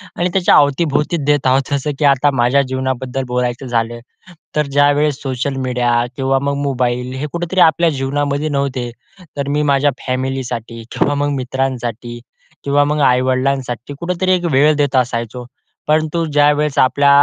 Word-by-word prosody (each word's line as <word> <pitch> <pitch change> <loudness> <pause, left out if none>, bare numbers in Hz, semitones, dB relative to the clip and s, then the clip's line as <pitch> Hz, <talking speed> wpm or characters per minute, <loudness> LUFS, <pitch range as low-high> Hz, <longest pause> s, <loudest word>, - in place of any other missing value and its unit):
आणि 175 +1 0
त्याच्या 190 -2 +4
अवतीभोवतीच 145 +1 +1
देत 145 -2 +2
आहोत. 135 +2 +1
जसं 140 +2 -1
की 150 - +2
आता 140 +2 +1
माझ्या 125 +4 +3
जीवनाबद्दल 130 0 -2
बोलायचं 125 +1 -1
झालं. 120 0 -1 0.6
तर 150 -1 +1
ज्यावेळेस 145 0 +2
सोशल 135 +1 -2
मीडिया 120 -1 0 0.2
किंवा 135 0 +1
मग 140 - 0
मोबाईल 125 -2 -1
हे 145 - -3
कुठेतरी 175 +2 -2
आपल्या 165 +2 +2
जीवनामध्ये 145 +2 -1
नव्हते. 135 -4 -2 0.5
तर 140 - -2
मी 145 +1 0
माझ्या 140 +1 +2 0.2
फॅमिलीसाठी 125 -3 -3
किंवा 145 0 0
मग 145 - +1
मित्रांसाठी 125 -3 -3 0.4
किंवा 145 +1 +2
मग 150 +1 -1
आई-वडिलांसाठी 130 0 0
कुठेतरी 180 +2 -1
एक 180 -1 +1
वेळ 145 +3 +4
देत 145 -2 0
असायचो. 120 -1 -1 0.4
परंतु 155 +2 +1
ज्यावेळेस 145 0 +2
आपला 140 +2 +3
135 Hz, 145 wpm, -17 LUFS, 125-145 Hz, 0.6 s, त्याच्या